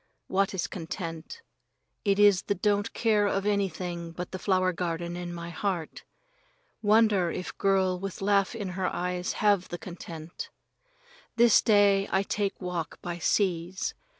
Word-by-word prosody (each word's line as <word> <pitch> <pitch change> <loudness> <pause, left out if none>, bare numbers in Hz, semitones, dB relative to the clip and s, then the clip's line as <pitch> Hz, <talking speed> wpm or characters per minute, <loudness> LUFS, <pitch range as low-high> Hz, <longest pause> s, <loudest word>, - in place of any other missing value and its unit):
What 195 +1 0
is 180 - -1
content? 170 - -6 0.6
It 200 -2 +2
is 205 -3 +6
the 200 - -1
don't 205 +1 +1
care 215 -3 +2
of 195 0 -1
anything 180 -4 -2
but 180 +1 -6
the 185 - -5
flower 185 -1 +2
garden 170 0 -3
in 175 0 -5
my 170 0 -6
heart. 175 -2 -3 0.8
Wonder 210 -4 +4
if 180 - -5
girl 190 -2 +2
with 195 -1 -5
laugh 200 +2 +2
in 205 -4 -4
her 185 0 -2
eyes 180 0 -2
have 205 -3 +2
the 175 - -4
content? 170 -2 -8 0.9
This 235 -1 +6
day 200 -2 +4
I 190 - +2
take 200 0 -2
walk 180 -3 -4
by 175 -1 -4
seas. 180 0 0
185 Hz, 150 wpm, -28 LUFS, 175-200 Hz, 0.9 s, is